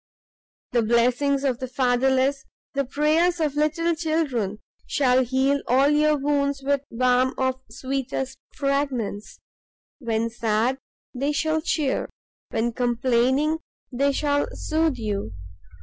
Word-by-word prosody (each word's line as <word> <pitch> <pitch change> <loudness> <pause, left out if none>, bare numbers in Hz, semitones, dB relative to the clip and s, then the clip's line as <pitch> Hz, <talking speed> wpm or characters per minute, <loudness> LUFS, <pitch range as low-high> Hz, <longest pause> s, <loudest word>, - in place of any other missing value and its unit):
The 240 - +2
blessings 245 +5 +2
of 260 -3 0
the 260 - -4
fatherless, 265 +2 +1 0.3
the 275 0 +1
prayers 315 +6 +2
of 305 -3 0
little 310 +3 +1
children, 310 - -1 0.3
shall 260 -2 +3
heal 265 +3 +1
all 265 +3 +4
your 300 0 +3
wounds 280 -1 0
with 280 0 +1
balm 250 +2 +2
of 260 0 -1
sweetest 265 +2 -4 0.2
fragrance. 275 -7 -2 0.6
When 230 -3 -1
sad, 230 +3 0 0.3
they 275 +3 -1
shall 315 +2 0
cheer, 305 -4 -1 0.4
when 230 +2 0
complaining, 255 +5 +1 0.3
they 275 +3 +1
shall 285 +1 0
soothe 315 -3 0
you. 205 - -3
265 Hz, 120 wpm, -24 LUFS, 245-290 Hz, 0.6 s, all